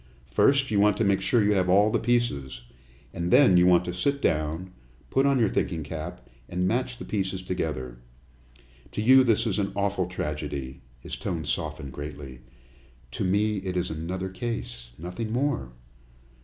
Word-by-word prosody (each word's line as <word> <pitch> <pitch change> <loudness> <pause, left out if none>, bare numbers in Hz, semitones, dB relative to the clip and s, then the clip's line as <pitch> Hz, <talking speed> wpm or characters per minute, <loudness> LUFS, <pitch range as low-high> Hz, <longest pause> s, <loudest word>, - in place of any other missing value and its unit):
First, 135 - +3
you 105 - +2
want 105 -1 +4
to - - +1
make 100 -2 +2
sure 110 +3 +3
you 105 +1 +3
have 95 -2 +1
all 100 +3 +5
the - - +1
pieces, 70 - -1 0.5
and 85 0 -2
then 125 -3 +6
you 90 0 +6
want 90 -1 +5
to 90 - -3
sit 140 +11 0
down, 80 - -1 0.4
put 135 +1 +3
on 140 -1 +3
your 115 -3 +3
thinking 85 -4 -1
cap, 80 -2 -7 0.2
and 90 +1 0
match 125 +3 -1
the - - -8
pieces 95 -2 -2
together. 65 -10 -4 0.9
To - - -2
you 130 +3 +7
this 115 -2 +2
is 110 -2 0
an 100 - -1
awful 100 -2 0
tragedy," 75 -6 -5 0.2
his - - -6
tone - - -4
softened 70 -1 -3
greatly, 70 -3 -8 0.7
"to - - -3
me 105 +3 +1
it 95 -1 -3
is 90 -1 -1
another 90 +4 -4
case, 90 - -5
nothing 90 +7 -5
more. 125 - -1
95 Hz, 170 wpm, -26 LUFS, 80-110 Hz, 0.9 s, you